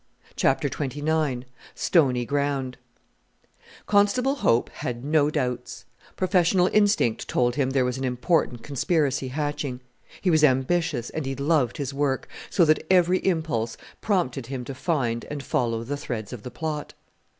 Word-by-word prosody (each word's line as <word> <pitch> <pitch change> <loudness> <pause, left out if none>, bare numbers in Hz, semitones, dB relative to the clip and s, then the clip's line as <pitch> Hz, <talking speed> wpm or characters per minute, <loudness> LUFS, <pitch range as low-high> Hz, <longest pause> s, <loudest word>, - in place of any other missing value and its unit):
CHAPTER - - +2
XXIX 145 -1 -1 0.3
STONY 130 -8 +2
GROUND 140 -2 -1 1.1
Constable 210 +6 +3
Hope 115 - +2
had 120 +1 -5
no 150 -1 +3
doubts. 130 -5 -3 0.3
Professional 180 -1 +3
instinct 205 - +2
told 120 -1 +1
him 135 0 0
there 135 -1 +2
was 125 +1 -2
an - - -3
important 125 -1 0
conspiracy 140 -2 0
hatching. 145 -2 -3 0.4
He 185 - +1
was 155 -1 +3
ambitious, 135 -1 +2
and 155 -4 -4
he 135 - -2
loved 140 -3 +1
his 140 -1 -3
work, 140 -2 -1 0.2
so 175 - +4
that 155 0 +3
every 185 0 +4
impulse 155 -11 -1 0.2
prompted 135 - 0
him 130 -2 -5
to 135 - -5
find 130 -5 -1
and 145 -2 -6
follow 115 -2 -1
the 145 +5 -3
threads 115 -7 -5
of 120 - -7
the 125 - -7
plot. 150 +3 -5
140 Hz, 145 wpm, -25 LUFS, 125-160 Hz, 1.1 s, so